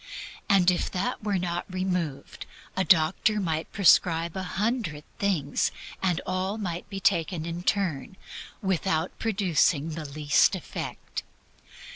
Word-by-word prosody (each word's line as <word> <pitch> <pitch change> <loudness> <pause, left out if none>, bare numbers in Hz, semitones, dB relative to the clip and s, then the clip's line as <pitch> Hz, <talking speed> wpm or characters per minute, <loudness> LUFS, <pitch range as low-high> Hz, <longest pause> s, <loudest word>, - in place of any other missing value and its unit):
If 180 -2 +4
that 205 +5 -2
were 205 -2 +1
not 175 0 -3
removed, 180 -7 -3 0.3
a 190 - +2
doctor 185 +4 +3
might 160 -4 -2
prescribe 170 -3 +4
a 190 - -2
hundred 190 -4 -2 0.2
things, 180 -9 +1 0.3
and 180 -3 +1
all 185 +3 -1
might 180 -5 -4
be 195 - -5
taken 170 -3 +1
in 170 +1 -4
turn, 185 -3 -1 0.5
without 185 -3 0
producing 180 -7 +2
the 155 0 -5
least 145 +5 +3
effect. 185 - -6
180 Hz, 120 wpm, -27 LUFS, 160-195 Hz, 0.5 s, If